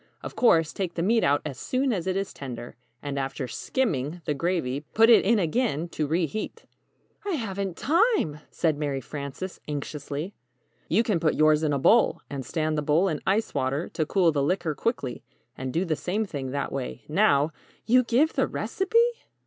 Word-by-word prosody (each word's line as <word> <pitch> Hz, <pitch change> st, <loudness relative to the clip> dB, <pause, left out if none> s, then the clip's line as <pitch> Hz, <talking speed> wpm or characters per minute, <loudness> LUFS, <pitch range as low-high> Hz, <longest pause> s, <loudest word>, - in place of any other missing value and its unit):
Of -, -, -7 dB
course, 165 Hz, -10 st, +4 dB
take 185 Hz, -3 st, -3 dB
the 170 Hz, -, -1 dB
meat 225 Hz, +4 st, +3 dB
out 145 Hz, +1 st, +2 dB
as 140 Hz, -4 st, -5 dB
soon 260 Hz, 0 st, 0 dB
as 185 Hz, -3 st, -3 dB
it 185 Hz, 0 st, 0 dB
is 195 Hz, 0 st, -3 dB
tender, 120 Hz, -4 st, -7 dB, 0.3 s
and 140 Hz, -1 st, -3 dB
after 135 Hz, -1 st, -3 dB
'skimming' 165 Hz, -, -2 dB
the 150 Hz, -, 0 dB
gravy, 145 Hz, -4 st, -1 dB, 0.2 s
put 225 Hz, +2 st, +6 dB
it 230 Hz, -, +7 dB
in 225 Hz, +4 st, +3 dB
again 175 Hz, -, 0 dB
to 155 Hz, -3 st, -2 dB
re 165 Hz, +3 st, +1 dB
heat." 215 Hz, -, -6 dB, 0.6 s
"I 400 Hz, -2 st, -2 dB
haven't 200 Hz, -, -3 dB
time!" 335 Hz, -, +2 dB
said 155 Hz, -3 st, 0 dB
Mary 145 Hz, -3 st, -1 dB
Frances, 140 Hz, +7 st, -6 dB
anxiously. 150 Hz, +4 st, -4 dB, 0.5 s
"You 210 Hz, +8 st, +3 dB
can 210 Hz, -7 st, +1 dB
put 155 Hz, -2 st, +1 dB
yours 155 Hz, 0 st, +4 dB
in 155 Hz, -2 st, +1 dB
a 140 Hz, -, +1 dB
bowl, 225 Hz, -, +4 dB
and 140 Hz, -2 st, -4 dB
stand 155 Hz, +1 st, -1 dB
the -, -, -1 dB
bowl 155 Hz, +6 st, +2 dB
in 155 Hz, -3 st, -3 dB
ice 205 Hz, +4 st, +1 dB
water 140 Hz, +3 st, -1 dB
to 155 Hz, -3 st, -2 dB
cool 180 Hz, -3 st, +3 dB
the 145 Hz, -2 st, 0 dB
liquor 165 Hz, +2 st, 0 dB
quickly, 145 Hz, -, -3 dB, 0.3 s
and 130 Hz, 0 st, -4 dB
do 170 Hz, +7 st, 0 dB
the 160 Hz, -3 st, 0 dB
same 205 Hz, +8 st, -2 dB
thing 140 Hz, -8 st, -5 dB
that 140 Hz, +2 st, -3 dB
way, 65 Hz, 0 st, -5 dB
now 145 Hz, +2 st, +3 dB, 0.2 s
" -, -, -32 dB
"You 250 Hz, +2 st, +5 dB
give 260 Hz, +7 st, +2 dB
the -, -, +1 dB
recipe?" 385 Hz, +4 st, -1 dB
165 Hz, 195 wpm, -26 LUFS, 145-205 Hz, 0.6 s, it